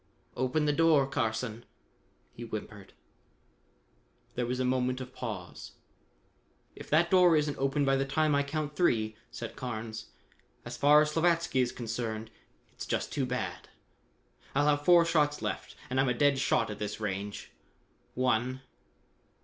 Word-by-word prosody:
"Open 130 +4 0
the 150 - +2
door, 160 -3 +4
Carson," 115 -3 -2 0.7
he - - -11
whimpered. 105 -3 -7 1.4
There 125 -1 -2
was 125 +1 -2
moment 130 0 0
of 130 0 -8
pause. 100 -8 -7 1.0
"If - - -11
that 170 +3 +3
door 180 -3 +6
isn't 150 -1 -1
open 135 +1 +1
by 135 0 +3
the 135 - +1
time 155 +2 +1
I 140 - +3
count 150 +1 -3
three," 110 -10 +1
said - - -7
Carnes, 110 -2 -5 0.3
" - - -37
as - - -6
far 150 +1 +6
as 150 - -2
Slavatsky 165 -4 +2
is 125 - 0
concerned, 115 -2 -4 0.4
it's - - -8
just - - -2
too 135 -3 -1
bad. 95 -8 -4 0.9
I'll 145 +1 +3
have 145 0 +1
four 175 -1 +7
shots 150 -3 +2
left - - -4
and 130 - -1
I'm 135 -1 +3
a 125 - +1
dead 140 +1 +3
shot 120 - +1
at 105 - -7
this 105 +1 -4
range. 100 -1 -4 0.6
One! 130 +1 0
130 Hz, 150 wpm, -30 LUFS, 115-150 Hz, 1.4 s, four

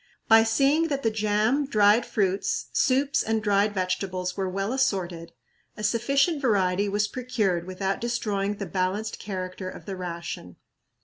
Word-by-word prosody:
By 225 0 +7
seeing 275 +8 +2
that 280 -3 -2
the 225 - +2
jam, 215 +6 +1
dried 210 -1 +4
fruits, 195 -3 -1
soups, 275 +1 +2
and 220 0 -1
dried 205 0 +2
vegetables 185 -1 -2
were 190 -2 -2
well 195 +5 -2
assorted, 180 -10 -1 0.5
a 210 - -6
sufficient 275 +8 +1
variety 200 -5 +2
was 205 +1 +1
procured 210 -9 -1
without 190 +1 -2
destroying 210 -4 -1
the 200 - -5
balanced 190 +4 -2
character 185 -1 -5
of - - -11
the 195 - -5
ration. 170 - -6
205 Hz, 145 wpm, -26 LUFS, 185-230 Hz, 0.5 s, By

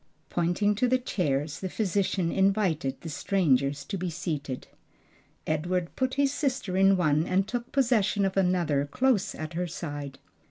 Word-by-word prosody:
Pointing 175 +4 +1
to 250 +3 +2
the 255 +1 +3
chairs, 150 - -1
the 190 - -4
physician 190 -3 0
invited 190 -9 +1
the 165 - -6
strangers 140 -5 +1
to 195 - -4
be 180 0 -2
seated. 155 -6 -4 0.8
Edward 170 +3 -1
put 260 0 -1
his 280 -1 +2
sister 260 -11 -1
in 195 0 +5
one 155 -1 +2
and 190 +2 +1
took 240 0 -4
possession 225 -7 +2
of 190 - -1
another 175 -7 +1
close 240 - +1
at 155 +2 -6
her 175 +2 -2
side. 145 -5 -6
180 Hz, 155 wpm, -28 LUFS, 155-205 Hz, 0.8 s, in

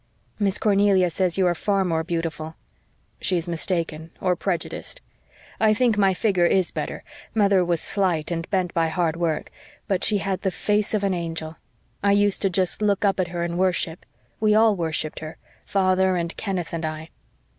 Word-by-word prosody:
"Miss 200 -1 +2
Cornelia 200 -3 +3
says 180 +1 0
you 190 - +3
are 175 - +3
far 195 +3 0
more 165 -2 0
beautiful." 165 -2 -4 0.6
"She 185 - 0
is 170 0 -3
mistaken 165 -2 -2
or 180 -1 +1
prejudiced. 180 - -4 0.6
I 215 -1 +4
think 235 -1 +2
my 195 -2 +3
figure 185 -4 +2
IS 185 -1 +2
better - - -5 0.3
mother 200 -3 +4
was 170 -2 0
slight 180 -5 +1
and 165 -1 -3
bent 185 -3 0
by 165 -1 +2
hard 160 0 0
work 165 -3 -2 0.4
but 190 -3 0
she 210 - +3
had 195 -1 -2
the 190 - +1
face 210 +4 0
of 205 - -1
an 195 -1 +1
angel. 165 -2 -5 0.4
I 200 0 +3
used 200 -1 +2
just 185 +1 +1
to 215 - 0
look 205 0 +2
up 195 -1 +2
at 185 - +1
her 175 -1 -3
in 170 0 -3
worship. 180 -2 -1 0.3
We 215 -1 +3
all 220 -1 +5
worshipped 160 -3 -2
her, 155 0 -8 0.3
father 190 -1 +2
and 170 -1 -2
Kenneth 185 -6 -3
and 165 0 -3
I." 155 +1 -5
185 Hz, 185 wpm, -24 LUFS, 165-200 Hz, 0.6 s, all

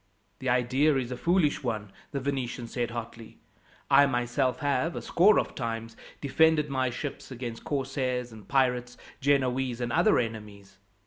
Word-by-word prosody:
"The 130 - -2
idea 130 +5 +3
is 130 -2 -3
a - - -2
foolish 170 +2 +2
one," 110 -6 -3 0.2
the 140 - -3
Venetian 130 -3 -3
said 120 0 -2
hotly. 115 -1 -8 0.5
"I 140 - +6
myself 125 +1 0
have, 145 +3 0
a - - -4
score 200 +5 +5
of - - -3
times, 115 -2 -4 0.2
defended 150 +1 +3
my 130 -1 +1
ships 135 +4 -6
against 120 -3 -6
corsairs 130 -3 -2
and 110 -2 -13
pirates, 125 -2 +1 0.2
Genoese, 130 -3 +1
and 120 -1 -2
other - - +4
enemies. 105 -4 -5
125 Hz, 150 wpm, -28 LUFS, 120-140 Hz, 0.5 s, I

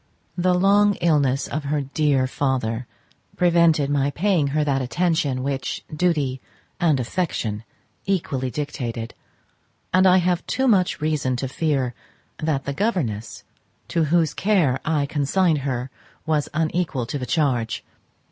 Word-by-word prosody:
The 180 0 +2
long 200 +2 +4
illness 145 -5 +1
of 145 0 -4
her 145 +1 0
dear 140 -1 +1
father 125 -3 -1 0.5
prevented 170 -4 +4
my 140 -1 +2
paying 170 -1 +1
her 150 +2 +1
that 140 -2 0
attention 145 -2 0
which 135 -2 -3
duty 150 -6 0 0.4
and 160 -7 +3
affection 115 - -2 0.4
equally 145 -9 -1
dictated, 125 -5 -4 0.8
and 185 +1 +5
I 185 0 +6
have 180 -1 +1
too 265 +1 0
much 185 -8 +2
reason 150 -4 0
to 135 +2 -3
fear 135 -3 -1 0.5
that 155 -3 -1
the 140 - -2
governess 140 - -2 0.5
to 165 -2 +1
whose 160 0 +2
care 180 -11 +2
I 150 -3 +1
consigned 155 +3 +1
her 130 -1 -3 0.3
was 155 -2 0
unequal 155 -4 -1
to 145 - -4
the 125 - -5
charge. 130 -8 0
150 Hz, 135 wpm, -23 LUFS, 130-170 Hz, 0.8 s, I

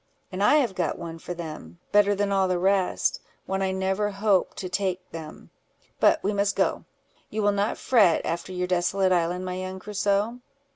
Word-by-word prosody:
"And 185 +1 -4
I 290 - +5
have 255 -9 +2
got 175 -4 -1
one 165 -1 -7
for 175 - -6
them, 155 - -8
better 205 0 +4
than 200 0 0
all 195 -1 +2
the 185 -1 0
rest—one 190 0 -1
I 190 -1 +1
never 190 +2 0
hoped 200 -1 +1
to 185 - -4
take 185 0 -2
them: 160 -2 -9 0.5
but - - +4
we 205 - 0
must 200 0 +1
go: - - 0 0.4
you 215 0 -2
will 205 - +4
not 200 +2 0
fret 210 -10 +3
after 170 +3 -3
your 180 0 -2
desolate 185 +1 +1
island, 180 +1 +1
my 185 0 -4
young 185 0 -5
Crusoe?" 205 +3 -1
190 Hz, 185 wpm, -26 LUFS, 180-200 Hz, 0.5 s, I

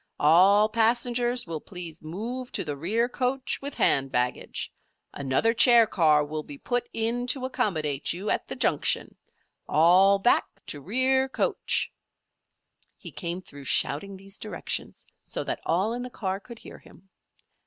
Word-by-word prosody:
All 190 +7 +5
passengers 240 +2 +1
will 165 -3 -5
please 175 -4 -8
move 230 +11 -6
to - - 0
the 145 -3 -4
rear 210 +11 0
coach 255 +1 -2
with 280 0 -6
hand 135 -1 +2
baggage. 125 0 -2 0.4
Another 140 +12 +1
chair 235 -1 +6
car 155 -7 +3
will 155 +1 -4
be 145 -1 -10
put 245 - -2
in 235 +2 -1
to 255 0 0
accommodate 155 - -1
you 190 +5 -3
at - - -1
the - - -5
junction. - - +1 0.5
All 185 +5 +5
back 195 +5 +3 0.2
to 145 - -4
rear 260 - +1
coach!" - - -1 1.0
He - - -8
came 175 0 -4
through 145 -4 -12
shouting 195 +9 0
these 195 +1 -7
directions - - -4 0.2
so - - -4
that - - -4
all 190 +7 +1
in 245 - -4
the 250 - -6
car 195 -5 -3
could 235 +3 -12
hear - - -12
him. 195 +2 -20
200 Hz, 155 wpm, -26 LUFS, 160-240 Hz, 1.0 s, chair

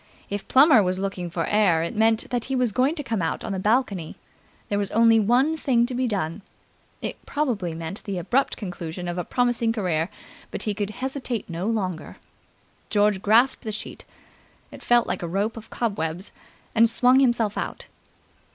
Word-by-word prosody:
If 205 0 -4
Plummer 270 -3 +7
was 185 -1 0
looking 190 -2 -3
for 165 0 -2
air, 195 -6 +3
it 170 - -4
meant 220 +1 +2
that 245 -2 -1
he 270 - -2
was 250 -3 +1
going 260 +8 +1
to 295 - -5
come 225 -7 -2
out 165 - -2
on - - -4
the 190 - -2
balcony. 205 -5 0 0.5
There 205 - -1
was 200 - -1
only 230 0 +5
one 250 +9 +3
thing 250 -6 +2
to 255 - -4
be 250 +1 0
done. 190 -4 -2 0.6
It - - -5
probably 225 - -1
meant 165 +5 -6
the 200 -3 -3
abrupt 250 +10 0
conclusion 175 -3 -6
of 175 +1 -3
a - - -1
promising 240 0 +1
career, 180 -7 -1 0.4
but - - -5
he 210 - -1
could 205 0 -3
hesitate 255 0 -4
no 170 +4 -3
longer. 185 -8 -3 0.7
George 205 -2 +2
grasped 235 +6 +4
the 220 - -3
sheet 210 - -7 0.7
it - - -11
felt 240 -1 +3
like - - -3
a 170 - -3
rope 200 +6 -1
of 225 -1 -10
cobwebs 185 -5 -3 0.4
and 230 0 +5
swung 250 +3 +4
himself 235 -5 +2
out. - - -5
215 Hz, 185 wpm, -24 LUFS, 185-240 Hz, 0.7 s, Plummer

